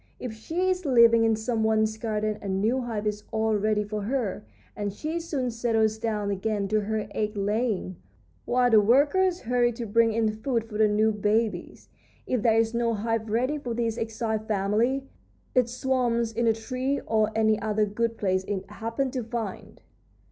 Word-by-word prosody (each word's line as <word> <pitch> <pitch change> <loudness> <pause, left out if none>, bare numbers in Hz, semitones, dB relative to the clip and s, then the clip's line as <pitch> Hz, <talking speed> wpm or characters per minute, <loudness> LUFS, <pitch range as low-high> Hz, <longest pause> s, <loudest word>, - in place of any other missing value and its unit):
If 245 -3 -5
she 330 +12 -2
is 370 0 -2
living 235 -5 +5
in 225 -1 +3
some 220 +1 -1
one's 220 0 +2
garden 215 -1 -2
a - - -6
new 215 +7 +1
hive 225 -4 -4
is 210 0 -2
all 220 0 +1
ready 210 0 +1
for 210 0 -4
her, 230 -2 -2 0.3
and 205 -1 -3
she 310 - -4
soon 280 -7 -2
settles 225 -2 +1
down 210 -3 -1
again 200 +1 -1
to 215 +1 +2
her 215 +1 -2
egg 210 0 -2
laying, 205 -2 -1 0.5
while 245 0 +2
the 215 -1 +7
workers 295 - +3
hurry 240 0 +2
to 235 0 -5
bring 230 +2 +3
in 220 0 +1
food 230 +2 -2
for 220 -1 -7
the 215 - +5
new 215 +1 +2
babies. 215 +1 -1 0.4
If 250 -4 -1
there 225 -1 +3
is 225 0 +2
no 235 -1 +1
hive 225 +1 -2
ready 255 +7 0
for 245 -5 -4
this 230 -1 -1
exiled 220 -1 -3
family, 220 +6 +1 0.5
it 250 -3 +3
swarms 240 -2 0
in 230 +1 0
a 225 - +5
tree 255 +5 -2
or 215 -1 +1
any 220 -1 +2
other 215 0 +1
good 230 +2 -2
place 185 -2 0
it 195 -1 -4
happens 230 +5 -3
to 255 -3 -2
find." 225 -3 -6
225 Hz, 185 wpm, -26 LUFS, 215-240 Hz, 0.5 s, the